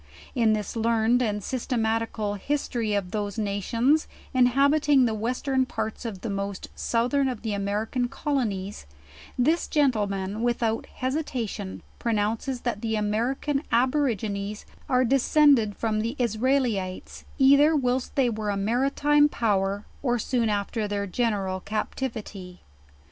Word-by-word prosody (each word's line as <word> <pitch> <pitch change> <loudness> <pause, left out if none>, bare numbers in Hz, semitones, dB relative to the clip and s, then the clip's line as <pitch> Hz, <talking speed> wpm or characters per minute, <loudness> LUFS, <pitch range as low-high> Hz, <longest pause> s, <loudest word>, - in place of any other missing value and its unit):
In 230 -4 +3
this 210 +1 -3
learned 230 +1 +2
and 210 -4 -1
systematical 225 -4 -1
history 230 -2 -1
of 185 -3 -2
those 205 -1 -3
nations, 230 +8 +1 0.3
inhabiting 275 +2 +4
the 225 - 0
western 255 +4 0
parts 230 -5 -4
of 200 -5 -5
the 230 - -4
most 200 -1 -4
southern 250 +4 +1
of 245 -5 -4
the 220 -2 -2
American 210 +5 -1
colonies; 210 - -3 0.5
this 310 +7 +2
gentleman, 210 -8 0
without 235 -2 0
hesitation, 255 -8 -4 0.2
pronounces 230 +3 -1
that 235 -4 -2
the 220 -1 -1
American 235 +7 0
Aborigines 225 -5 0 0.2
are 255 0 +3
descended 270 -4 +4
from 220 -2 0
the 230 +5 -2
Israelites, 235 -5 -1
either 280 +3 +6
whilst 255 -2 0
they 270 -3 +3
were 215 -2 -2
a 200 - 0
maritime 275 +7 +3
power, 200 -5 0 0.2
or 245 -3 +1
soon 235 0 0
after 210 +1 -1
their 205 0 -2
general 195 -2 -1
captivity. 210 -3 -5
230 Hz, 125 wpm, -26 LUFS, 205-260 Hz, 0.5 s, either